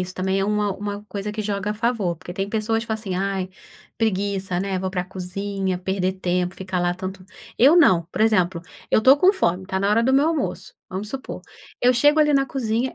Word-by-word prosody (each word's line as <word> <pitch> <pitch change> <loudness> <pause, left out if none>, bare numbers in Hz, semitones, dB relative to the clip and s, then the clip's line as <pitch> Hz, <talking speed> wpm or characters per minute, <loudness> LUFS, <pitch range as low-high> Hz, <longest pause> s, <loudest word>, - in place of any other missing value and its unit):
isso 180 0 -4
também 190 +1 -1
é - - +1
uma 210 -1 0
uma 205 +1 -5
coisa 205 +1 -4
que 215 0 -3
joga 200 0 -2
a - - -2
favor, 215 -6 -1
porque 175 - -9
tem 195 +2 -3
pessoas 225 +1 -1
que - - -14
falam, 220 -1 -3
assim, 195 -4 -4
ai, 190 -1 -2 0.5
preguiça, 195 -4 -1
né, 195 -1 -2
vou 190 0 -3
pra 180 -1 -2
cozinha, 190 +1 -3
perder 190 0 -1
tempo, 180 -1 -1
ficar 185 -1 -3
lá 175 0 +1
tanto. 190 0 -7 0.3
Eu 285 +8 +6
não, 185 - +5
por - - -4
exemplo, 185 -6 +2 0.3
eu - - +5
estou 260 +6 +6
com 365 +6 +5
fome, 185 - 0
está 190 0 -2
na 200 - +1
hora 225 +2 +3
do 260 +2 +2
meu 285 +4 +4
almoço, 325 -3 -3
vamos 195 +3 -5
supor, 265 +3 -6 0.4
eu 250 +1 +5
chego 290 +5 +4
ali 300 -1 +4
na 275 0 +3
cozinha, 245 -1 -2
200 Hz, 225 wpm, -22 LUFS, 185-225 Hz, 0.5 s, Eu